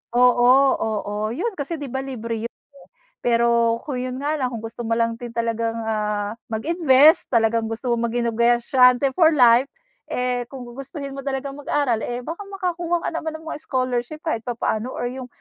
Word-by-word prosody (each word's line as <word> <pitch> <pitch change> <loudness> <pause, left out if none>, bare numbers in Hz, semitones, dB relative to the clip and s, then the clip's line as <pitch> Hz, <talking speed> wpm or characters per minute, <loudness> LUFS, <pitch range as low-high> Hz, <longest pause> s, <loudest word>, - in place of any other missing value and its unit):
oo 245 0 +5 0.3
oo 210 -2 -2 0.2
yun 455 - -1
kasi 285 +4 -2
di 275 - -5
ba 265 - -2
libre 230 -4 -4
yun. - - -46 0.7
Pero 235 -1 +3
kung 275 - -3
yun 255 +1 -4
nga 295 +2 0
lang 255 -2 -1
kung 230 - -4
gusto 225 +1 -6
mo 225 - -4
lang 230 0 0
din 240 -1 -8
talagang 230 0 -1
ah, 210 0 -2
mag-invest 300 +3 +4
talagang 225 -1 +2
gusto 225 +3 -4
mong 235 0 -1
maging 240 0 -1
negosyante 245 +3 +4
for 325 -2 +6
life, 245 -2 +6 0.5
eh 250 -1 -1
kung 260 - -7
gugustuhin 275 +3 -7
mo 275 - -5
talagang 275 0 -3
mag-aral 285 -5 0
eh 245 0 -3
baka 330 +10 -6
makakuha 350 -3 -2
ka - - +1
naman 320 -1 -3
ng 320 - -16
mga 300 - -5
scholarship 255 +1 -2
kahit 315 -9 -1
papaano, 235 0 -2
or 245 - -3
yung 255 0 -7
245 Hz, 180 wpm, -22 LUFS, 230-280 Hz, 0.7 s, for